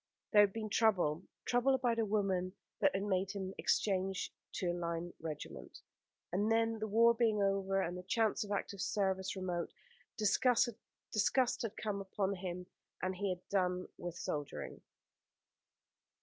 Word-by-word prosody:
There 210 - +9
had 205 -1 +5
been 215 0 -4
trouble 185 -8 +2 0.2
trouble 250 +2 +3
about 240 -3 +1
a 225 - +3
woman 190 -3 0 0.3
that - - +3
had 195 - 0
made 195 -1 0
him 190 -1 -4
exchange 190 -1 +1 0.2
to 180 -2 0
a - - -2
line 170 0 -3
regiment 155 -2 -7 0.5
and 205 +5 +1
then 225 0 +2
the 215 - -2
war 230 +3 +6
being 225 -2 +2
over, 195 0 +1
and 175 -2 -1
the 180 - -5
chance 220 +4 +1
of 205 - -8
active 200 -1 -2
service 190 -2 0
remote, 180 -2 -2 0.5
disgust 240 +3 +3 0.9
had 225 -3 -4
come 205 -2 -2
upon 195 0 -1
him, 180 -1 -5 0.3
and 185 0 -1
he 200 +1 -1
had 180 -1 -4
done 180 -2 0
with 175 -1 -6
soldiering. 145 -4 -4
195 Hz, 150 wpm, -35 LUFS, 180-215 Hz, 0.9 s, There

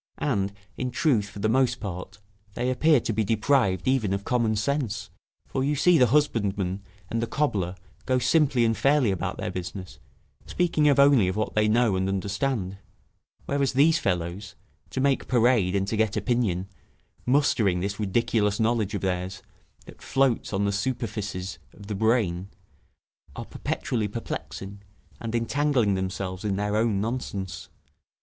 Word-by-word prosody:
And, 100 -8 0 0.3
in 125 - -2
truth, 120 -7 +1
for 100 - -12
the 100 +1 0
most 130 +3 +2
part, 95 0 -6 0.4
they 125 +1 0
appear 150 +3 +4
to 115 - -2
be 110 +1 +1
deprived 110 - +1
even 125 -7 +2
of 100 - -5
common 115 -2 +1
sense; 115 0 -2 0.3
for 130 - -2
you 145 +2 +1
see 165 +3 +4
the 125 - +6
husbandman 105 -8 +1 0.3
and 115 - 0
the 115 - -1
cobbler 100 -13 -1 0.3
go 130 0 +3
simply 130 -2 +3
and 115 0 +2
fairly 135 -3 +3
about 95 - -3
their - - -3
business, 90 +1 -7 0.5
speaking 160 -4 +2
only 140 -7 +5
of 95 - -1
what 110 0 -2
they 105 0 +3
know 110 -2 +3
and 95 +1 0
understand; 100 +1 -2 0.7
whereas 140 -1 0
these 155 +5 +4
fellows, 90 +2 -2 0.3
to - - -4
make 135 0 +1
parade 120 -6 +3
and 95 0 0
to 110 - -1
get 110 -1 +1
opinion, 105 -7 0 0.6
mustering 125 -9 +3
this 100 +3 -3
ridiculous 105 0 +1
knowledge 110 -2 +1
of - - -3
theirs, 90 0 -3 0.4
that - - -14
floats 135 -3 +1
on 100 0 0
the 100 - +1
superficies 105 -5 -3 0.2
of 100 - -12
the 105 - -4
brain, 100 -4 +1 0.9
are - - -6
perpetually 110 -4 -2
perplexing, 100 -2 -6 0.4
and 115 0 -4
entangling 120 -2 +1
themselves 95 0 -3
in 100 -2 0
their 105 +1 -1
own 110 -2 +2
nonsense. 100 -5 -4
110 Hz, 155 wpm, -26 LUFS, 95-130 Hz, 0.9 s, the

